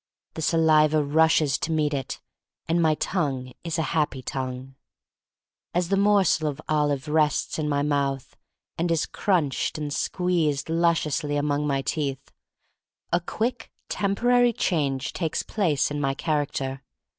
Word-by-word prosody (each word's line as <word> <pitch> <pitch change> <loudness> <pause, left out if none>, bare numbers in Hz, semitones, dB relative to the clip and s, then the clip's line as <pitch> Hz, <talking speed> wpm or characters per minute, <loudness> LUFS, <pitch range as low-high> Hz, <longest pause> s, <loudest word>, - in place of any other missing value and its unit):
The 160 - -6
saliva 155 -1 +4
rushes 155 -1 +3
to 165 - -2
meet 155 -2 +1
it, 135 -2 -4 0.5
and 170 +1 +2
my 160 -2 +3
tongue 135 -8 -2
is 165 -1 -2
a 160 - +1
happy 150 -5 0
tongue. 130 0 -5 1.0
As 175 -1 +1
the 195 - +3
morsel 195 -6 +3
of 145 0 -6
olive 145 -2 0
rests 150 +1 +1
in 150 -1 -1
my 145 -1 +1
mouth 140 -2 -1 0.4
and 170 +1 +1
is 165 -2 +1
crunched 165 -11 0
and 150 -1 -3
squeezed 165 -6 0
lusciously 165 -3 +1
among 145 0 0
my 135 -1 0
teeth, 140 -4 -3 0.8
a 175 - +4
quick, 230 +6 -3 0.2
temporary 240 +4 +2
change 140 -9 -1
takes 165 -3 -2
place 160 -10 0
in 145 0 -2
my 135 -1 0
character. 140 -3 -2
155 Hz, 140 wpm, -25 LUFS, 140-170 Hz, 1.0 s, saliva